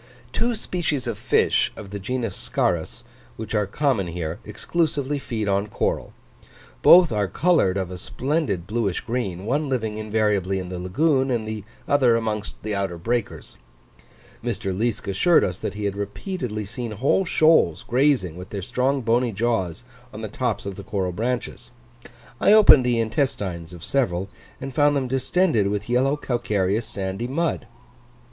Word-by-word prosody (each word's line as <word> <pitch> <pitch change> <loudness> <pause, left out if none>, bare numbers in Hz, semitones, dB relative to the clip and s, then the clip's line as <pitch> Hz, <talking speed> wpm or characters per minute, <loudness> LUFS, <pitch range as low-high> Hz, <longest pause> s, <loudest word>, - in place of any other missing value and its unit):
Two 240 0 0
species 165 - -2
of 120 -2 -2
fish, - - +2
of 100 -2 -10
the 100 - -5
genus 115 0 -3
Scarus, 85 +7 -1 0.3
which 110 0 -6
are 105 -2 +1
common 130 -5 0
here, 85 -1 -4
exclusively 145 -4 -1
feed 110 -5 -3
on 100 +1 +1
coral: - - -2 0.7
both 175 - +8
are 105 -2 0
coloured 100 - +2
of 95 -2 -3
a 90 - -7
splendid 130 - -2
bluish 105 -3 -1
green, 105 -7 -3
one 140 +5 0
living 110 -5 -2
invariably 105 -3 0
in 90 -1 -5
the 90 -1 -5
lagoon, 135 - +1
and 115 -3 -1
the 110 -2 -5 0.2
other 130 -5 +4
amongst 110 -2 -3
the 110 0 -2
outer 100 -3 -2
breakers. 115 - -3 0.9
Mr. 95 -1 -2
Liesk 110 0 -1
assured 100 - +4
us, 90 +1 -2
that - - -4
he 105 0 -4
had 100 -1 -1
repeatedly 105 - -4
seen 115 +2 -5
whole 135 - +2
shoals 155 - +3
grazing 125 - +2
with 90 +2 -9
their 100 -2 -5
strong 130 +6 0
bony 120 +1 +1
jaws 105 -4 -1 0.3
on 105 - -8
the - - -2
tops 110 -1 -2
of 100 -1 -5
the 100 - -7
coral 95 -3 -2
branches: 120 +6 -3 0.7
I 205 - +5
opened 210 -11 +8
the 120 -1 +2
intestines 105 - -2
of 85 -2 -11
several, 95 -9 0 0.3
and 135 -1 -6
found 145 +2 +3
them 135 -2 0
distended 130 - +2
with 105 +1 -2
yellowish 135 +4 +1
calcareous 110 -3 0
sandy 95 +4 -3
mud. 150 -3 -1
110 Hz, 160 wpm, -23 LUFS, 100-130 Hz, 0.9 s, both